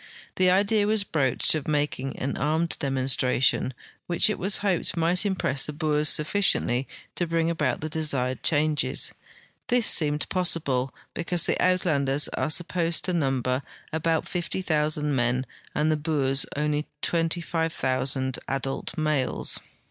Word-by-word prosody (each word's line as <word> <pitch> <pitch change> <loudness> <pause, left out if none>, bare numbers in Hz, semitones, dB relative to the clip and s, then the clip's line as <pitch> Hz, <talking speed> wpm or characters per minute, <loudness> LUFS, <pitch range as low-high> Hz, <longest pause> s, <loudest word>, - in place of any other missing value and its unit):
The 185 0 +4
idea 205 +3 +3
was 215 -1 +3
broached 135 -9 +1
of 155 -3 -3
making 145 -3 -1
an 135 - -2
armed 160 +3 +1
demonstration, 130 -1 +1 0.4
which 175 +4 +4
it - - -4
Avas 195 +2 +3
hoped 185 -3 0
might 175 +5 +2
impress 145 -8 0
the 150 - -4
Boers 150 -1 +1
sufficiently 150 -7 +2 0.3
to 175 - -2
bring 165 0 +1
about 150 -7 -1
the 155 - -2
desired 140 -5 -1
changes. 155 -1 +1 0.5
This 245 -2 +2
seemed 150 -5 +2
possible, 150 -8 -1 0.2
because 170 0 0
the - - +2
Uit 185 0 +2
landers 140 -3 +2
are 130 +3 -2
supposed 170 +1 0
to 185 - 0
number 135 -4 0 0.3
about 160 0 0
50,000 155 -4 -1
men 125 +1 +1 0.3
and 155 +1 +2
the 155 - +1
Boers 140 -3 0
only 150 0 0
about 150 0 -10
25,000 160 -6 0
* - - -42
adult 135 +4 -3
males. 155 -4 0
155 Hz, 140 wpm, -26 LUFS, 135-170 Hz, 0.5 s, The